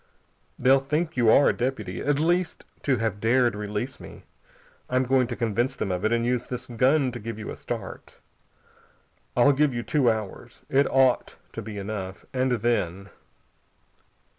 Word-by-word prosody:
They'll 135 +1 +5
think 155 +5 -2
you 120 -3 +3
are 140 - +6
a - - +3
deputy, 130 +2 -3
at 145 0 +1
least, 170 +3 0 0.2
to 135 -3 +1
have 110 -2 -2
dared 120 +2 +3
release 105 +5 -4
me. - - -12 0.7
I'm 130 +1 +2
going 130 -1 +2
to 120 - -4
convince 120 +3 0
them 100 - -3
of 90 0 -2
it, 110 - +2
and 115 0 +1
use 125 0 -1
this 125 - -4
gun 130 +3 +2
to 120 - -7
give 115 0 -6
you 110 - -6
a - - -6
start. - - -7 1.2
I 125 +4 +6
give 140 -2 +2
you 120 - -2
two 135 -3 +2
hours. 110 -3 -5
It 140 +1 +3
ought 130 -2 +2 0.2
to 115 - -6
be 110 -1 -7
enough. 100 -2 -6
And 130 0 +1
then...." 100 -5 -1
120 Hz, 170 wpm, -25 LUFS, 110-135 Hz, 1.2 s, are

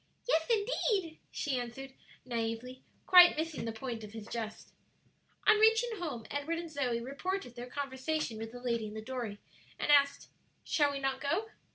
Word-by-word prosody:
"Yes, 320 -9 +2
indeed," 415 -6 +1
she 270 -4 -1
answered, 260 +3 -7 0.3
naïvely, 235 +2 -3 0.2
quite 355 -3 +9
missing 315 -5 -2
the 225 - -2
point 225 0 -5
of 210 0 -9
his 220 -2 -7
jest. 220 -1 -6 0.7
On 430 0 +6
reaching 450 +2 +4
home 290 -10 -4
Edward 290 +4 -2
and 335 -1 -6
Zoe 255 -5 0
reported 280 +4 -4
their 245 0 -8
conversation 275 -2 -2
with 225 0 -6
the 245 - -8
lady 235 -3 0
in 210 - -8
the 220 - -4
dory, 235 -4 -4 0.4
and - - +1
asked, 280 -1 +4 0.3
"Shall 295 -2 +2
we 280 -1 -3
not 270 -1 -1
go?" 410 +10 0
270 Hz, 170 wpm, -32 LUFS, 235-325 Hz, 0.7 s, quite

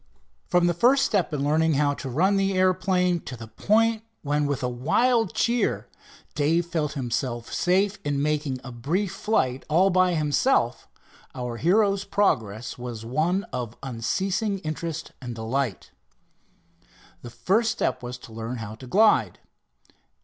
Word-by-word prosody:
From 180 -1 +3
the 175 - +2
first 250 +10 +4
step 195 -6 0
in 145 -2 -2
learning 155 +2 +2
how 145 0 +2
to 140 -1 -6
run 185 +10 +2
the 195 0 +1
airplane, 185 -1 +2
to 130 - -8
the 115 - -8
point 220 - +2 0.2
when 145 0 0
with 140 -2 -2
a - - +1
wild 225 - +1
cheer 240 +1 0 0.4
Dave 160 +3 +1
felt 160 -4 -2
himself 120 -3 -3
safe 195 +3 +1
in 145 -1 -1
making 145 -2 -1
a 130 - -8
brief 165 - -1
flight 135 - 0
all 185 +5 +4
by 185 -1 +3
himself, 150 - +1 0.5
our 125 -2 -4
hero's 195 - +2
progress 125 - -1
was 120 -2 -6
one 160 +10 0
of 120 -2 -4
unceasing 190 - -1
interest 155 +1 -4
and 120 -2 -6
delight. 115 0 -3 1.3
The 120 - -8
first 220 - +1
step 225 +2 -1
was 125 0 -6
to 115 - -14
learn 115 +2 -5
how 110 -2 -6
to 120 +4 -11
glide. 130 - +3
150 Hz, 150 wpm, -25 LUFS, 125-190 Hz, 1.3 s, first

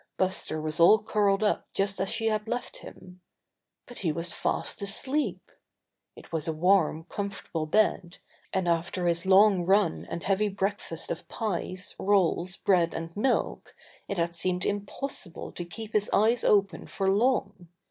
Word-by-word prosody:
Buster 185 -4 -1
was 155 +1 -3
all 210 +6 +6
curled 205 -2 +2
up 210 - 0
just 195 -1 0
as 195 - 0
she 225 0 -1
had 215 -1 0
left 245 +2 -4
him. 180 0 -13 0.6
But 245 - -8
he 170 -5 0
was 165 +2 -4
fast - - -2
asleep! 265 +9 -2 0.6
It - - -14
was 160 -2 -2
a 160 - 0
warm, 165 -1 +2
comfortable 185 -4 -4
bed, 180 -1 +1 0.3
and 190 -2 -1
after 170 +2 0
his 170 +1 0
long 195 -1 +6
run 170 - +2
and 170 0 -5
heavy 205 +2 +1
breakfast 195 -4 -3
of 170 - -5
pies, 185 -3 -3
rolls, 185 -2 +1
bread 175 -4 +2
and 165 0 -6
milk 245 +5 -1 0.3
it 200 - -3
had 170 0 -1
seemed 180 +1 -1
impossible 205 -1 -3
to 175 - -6
keep 215 +5 -9
his 210 -1 +1
eyes 225 +3 +3
open 200 -1 +2
for 195 - -2
long. 200 -3 +1
190 Hz, 160 wpm, -28 LUFS, 170-210 Hz, 0.6 s, all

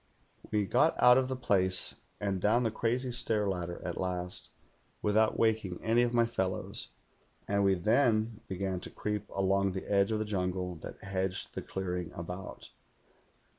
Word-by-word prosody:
We 105 -2 +1
got 145 +10 +3
out 125 +1 +7
of 130 - 0
the 130 - -2
place 95 -7 +3 0.2
and 100 -3 -1
down 115 +5 +3
the 115 - +1
crazy 125 +3 -1
stair 110 -4 +1
ladder 90 -2 -3
at 90 -2 -4
last, 90 -1 -1 0.5
without 110 +1 +3
waking 110 -5 +1
any 115 +2 +3
of 120 -1 +2
my 120 -1 +3
fellows, 95 -5 -2 0.6
and 100 0 +1
we 95 -1 +4
then 110 +2 +2
began 95 -1 -2
to - - -8
creep 105 -1 -4
along 95 0 +1
the 95 - -5
edge 100 +1 +2
of 110 - +1
the 110 - -2
jungle 90 -3 -2
that - - -10
hedged 95 -1 -3
the - - -4
clearing 90 -3 -4
about. 90 +2 -7
100 Hz, 165 wpm, -31 LUFS, 95-115 Hz, 0.6 s, out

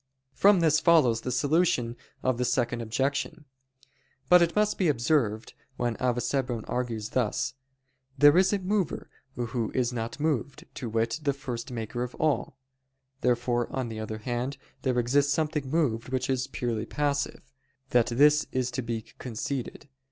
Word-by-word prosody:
From 200 -2 +5
this 155 -2 +4
follows 150 -9 +4
the 125 - -3
solution 130 -3 +1 0.3
of 130 -2 +1
the - - +2
second 120 -1 0
objection. 135 +6 -2 0.8
But 180 0 +8
it 170 -1 +2
must 210 0 +1
be 185 - +3
observed, 120 -5 +1 0.2
when 120 -2 -1
Avicebron 125 -1 -1
argues 115 -3 -3
thus, 125 -2 0 0.6
"There 145 +2 +7
is 190 +1 +4
a 205 - +2
mover 195 -1 -2 0.2
who 120 -2 -2
is 125 -1 +1
not 115 +3 -4
moved, 145 -3 -1
to 120 - -5
wit, 115 +5 0
the 140 -1 +1
first 125 -2 -6
maker 115 0 -4
of 125 0 -4
all; 145 -4 0 0.6
therefore, 120 -1 +1
on 130 -3 -2
the 110 -1 -6
other 110 0 -4
hand, 120 +5 -3 0.2
there 130 -2 0
exists 140 +4 +2
something 150 -3 -1
moved 130 -7 0
which 130 +1 -1
is 130 0 -1
purely 115 -3 -3
passive," 140 0 -2 0.4
that 120 -1 +4
this 150 +5 +4
is 130 -1 -1
to 125 +1 -2
be 115 -2 -3 0.2
conceded. 125 +3 -5
125 Hz, 155 wpm, -28 LUFS, 120-145 Hz, 0.8 s, But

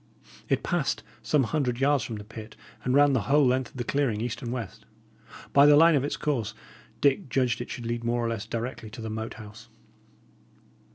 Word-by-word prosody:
It - - +1
passed - - -1 0.2
some 150 -3 +2
hundred 125 -1 -1
yards 140 0 +3
from 115 - -5
the 105 - -7
pit, 110 +1 -10 0.3
and 125 +1 +1
ran 145 0 +5
the 130 - +2
whole 145 0 +5
length 130 0 +1
of 135 - -15
the 120 - -2
clearing, 130 -4 0
east 120 +3 -3
and 120 -2 -4
west. 115 -6 -6 0.7
By 140 +1 +7
the 145 0 +7
line 165 +2 +7
of 140 -3 +2
its 145 - -2
course, 120 -8 -2 0.5
Dick 135 -1 +2
judged 125 -2 +1
it 120 - -6
should 120 - -6
lead 120 0 -3
more 120 0 0
or - - 0
less 110 -2 -4
directly 115 -1 -4
to 115 +2 -9
the 110 - -4
Moat 110 +1 -5
House. 110 +2 -12
120 Hz, 210 wpm, -27 LUFS, 115-140 Hz, 0.7 s, By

